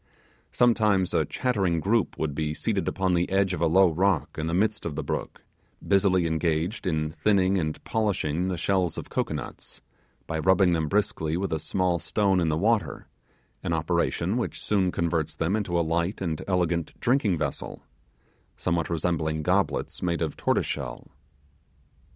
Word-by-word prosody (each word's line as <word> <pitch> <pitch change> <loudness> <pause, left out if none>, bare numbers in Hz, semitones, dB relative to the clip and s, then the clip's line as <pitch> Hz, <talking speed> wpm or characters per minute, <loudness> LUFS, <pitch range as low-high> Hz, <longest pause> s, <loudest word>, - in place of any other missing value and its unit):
Sometimes 105 -6 +3
a - - +2
chattering 95 -10 0
group 105 +4 +1
would 80 -2 -2
be 75 +1 -2
seated 100 -4 -1
upon 95 -1 0
the 85 0 +1
edge 95 -1 +2
of 85 - -4
a 85 - +4
low 90 +2 +5
rock 95 -1 +1
in 80 0 -3
the 85 - -2
midst 105 +2 +1
of 80 -3 -4
the 80 - -3
brook, - - -4 0.4
busily 95 -3 +3
engaged 80 +5 -1
in 75 -3 0
thinning 95 +1 +2
and 80 -2 -2
polishing 90 -6 0
the 90 -2 -2
shells 90 -1 0
of - - -7
cocoanuts, - - -4 0.4
by 80 -1 -3
rubbing 95 +1 +4
them 80 -2 0
briskly 80 -4 0
with 95 -2 -2
a 80 - 0
small 90 +2 0
stone 95 +3 +1
in 85 -2 +1
the 75 - 0
water, 110 +5 0 0.6
an 85 - -2
operation 85 +4 0
which 120 - -3
soon 95 -3 +1
converts 85 -3 -1
them 90 +5 0
into 95 -5 0
a 85 - +1
light 85 +4 -1
and 80 -5 -2
elegant 85 -3 -1
drinking 120 -8 +2
vessel, 70 -3 -4 0.7
somewhat 85 -2 -1
resembling 80 -2 -1
goblets - - 0
made 85 -2 0
of 80 - -3
tortoise - - +1
shell. - - -5
90 Hz, 165 wpm, -26 LUFS, 80-95 Hz, 0.7 s, low